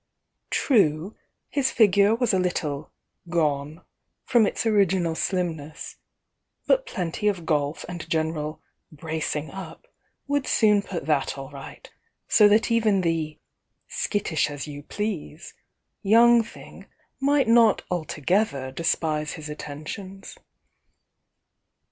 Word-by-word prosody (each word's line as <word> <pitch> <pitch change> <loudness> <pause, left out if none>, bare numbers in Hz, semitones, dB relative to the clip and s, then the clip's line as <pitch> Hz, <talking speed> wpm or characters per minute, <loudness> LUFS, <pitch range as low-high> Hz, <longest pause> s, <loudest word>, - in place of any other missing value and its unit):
True, 195 - +2 0.3
his 275 -2 0
figure 205 0 +4
was 235 -2 +1
a 190 - +3
little 160 -5 -2 0.4
"gone" 150 -2 -1 0.4
from 230 -4 +4
its - - -2
original 190 -6 +2
slimness, 160 -4 -3 0.3
— - - -54
but - - +3
plenty 180 0 -2
of 185 -5 -1
golf 150 -1 -1
and 170 -2 -7
general 155 -1 -2 0.3
"bracing 155 0 -4
up" 195 - -9 0.4
would 285 -1 -1
soon 210 -2 +4
put 180 -7 -6
that 145 -2 0
all 135 +1 -8
right, 140 -1 -10 0.4
so 210 - +6
that 215 +3 +3
even 215 -4 +3
the 160 -3 -1 0.5
"skittish 190 -8 -1
as 145 -1 -6
you 145 -1 -7
pleasc" 175 -3 -5 0.5
young 235 +3 +6
thing 225 - -12 0.3
might 280 -1 +2
not 230 -1 +5
altogether 160 -3 -1
despise 155 0 -1
his 155 -3 -8
attentions. 155 +7 -8
175 Hz, 115 wpm, -25 LUFS, 155-210 Hz, 0.5 s, so